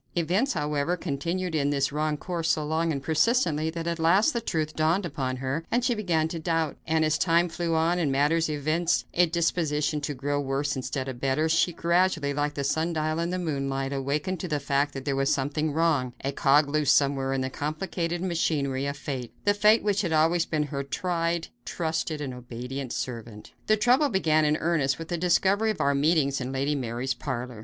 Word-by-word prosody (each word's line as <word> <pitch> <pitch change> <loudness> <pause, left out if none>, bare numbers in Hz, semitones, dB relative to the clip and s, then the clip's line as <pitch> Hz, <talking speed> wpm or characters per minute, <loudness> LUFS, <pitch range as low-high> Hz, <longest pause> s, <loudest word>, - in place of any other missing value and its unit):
Events, 180 - +1
however, 150 +1 -1
continued 170 +4 -3
in 145 -2 +1
this 140 -1 0
wrong 150 +1 -1
course 170 0 -3
so 155 -1 +1
long 160 +2 0
and 140 -3 -3
persistently 160 - +2
that 165 0 -5
at 170 0 -2
last 185 - +4
the 235 - -1
truth 155 -7 -2
dawned 165 +5 +1
upon 130 -6 -3
her 135 +5 -3
and 240 +1 +1
she 245 - +2
began 175 -8 0
to 165 - -4
doubt; 165 -2 -1
and 160 0 +2
as 155 -1 +1
time 170 0 +3
flew 165 0 -2
on 165 +2 +2
and 155 -5 +1
matters 150 +4 +2
evinced 155 +4 0
a 175 0 +4
disposition 160 -3 0
to 145 0 -3
grow 145 +2 -1
worse 140 +2 -1
instead 130 0 -3
of 130 -2 -6
better, 140 +4 +1
she 165 +2 +2
gradually, 170 -3 +1
like 145 +1 -1
the 140 - -2
sundial 155 +2 0
in 170 +1 -1
the 180 - -2
moonlight, 135 -5 -2
awakened 145 +7 -2
to 180 - -4
the 150 -3 -1
fact 140 +1 0
that 135 - -6
there 140 -2 0
was 135 0 +1
something 145 +3 0
wrong; 145 -5 +1
a 140 - 0
cog 140 +2 +3
loose 150 -1 +2
somewhere 135 -1 +2
in 135 -1 0
the 130 - -2
complicated 170 +4 -3
machinery 140 -6 0
of 140 0 -4
fate 130 -4 -5
the 205 - +4
fate 210 +2 +4
which 205 -1 +1
had 175 -5 -2
always 165 +2 +3
been 155 -2 0
her 140 -2 -4
tried, 170 +3 -2
trusted 160 -1 -2
and 135 -3 -4
obedient 125 +2 -6
servant. 115 -3 -6
The 215 - +4
trouble 255 +7 +3
began 155 - +2
in 150 +1 +2
earnest 155 -5 +1
with 165 0 -8
the 175 - -1
discovery 190 +5 +2
of 215 - -2
our 140 - +2
meetings 140 -1 +2
in 130 +1 -4
Lady 135 +2 0
Mary's 130 -1 -2
parlor. 125 -2 -5
155 Hz, 205 wpm, -26 LUFS, 140-170 Hz, -, last